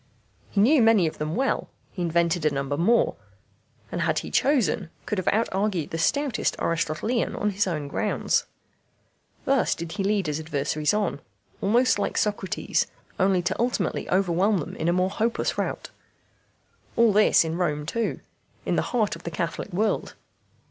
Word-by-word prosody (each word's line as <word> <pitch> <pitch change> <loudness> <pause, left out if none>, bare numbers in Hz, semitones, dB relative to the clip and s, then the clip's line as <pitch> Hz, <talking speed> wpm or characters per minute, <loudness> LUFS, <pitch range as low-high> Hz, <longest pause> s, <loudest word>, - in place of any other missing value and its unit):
He 200 - -1
knew 260 +7 +5
many 225 -5 +5
of 155 - -3
them 155 +1 -2
well, 265 +3 0 0.2
he 185 - -5
invented 170 0 +1
a 155 - +4
number 140 0 -2
more, 205 +10 +2 0.7
and - - -2
had - - +1
he - - -3
chosen 225 - +2 0.2
could 210 - -1
have 185 - -5
out 225 +2 +2
argued 190 -4 -1
the 165 - -3
stoutest 280 - +1
Aristotelian 165 +8 -1
on 210 - 0
his 200 +1 0
own 155 -5 -2
grounds. - - 0 1.0
Thus 275 -1 +2
did 170 0 -6
he 200 +1 -3
lead 200 -1 +1
his 150 0 -2
adversaries 150 +1 -1
on, 205 -8 -1 0.4
almost 235 +3 +3
like - - -1
Socrates, 205 -3 0 0.3
only 185 -1 +3
to 185 - -1
ultimately 240 +1 -1
overwhelm 190 +2 +2
them 155 - -5
in 160 - -2
a - - +4
more 185 +1 +1
hopeless 230 +3 0
rout. - - -3 1.0
All 230 -3 +4
this 210 -4 +5
in 160 0 -2
Rome 150 -4 -1
too, 230 +8 -2 0.4
in - - 0
the - - +3 0.2
heart 215 -6 +1
of 165 - -12
the 170 - -5
Catholic 170 0 -4
world. 205 +4 -1
185 Hz, 170 wpm, -25 LUFS, 165-215 Hz, 1.0 s, knew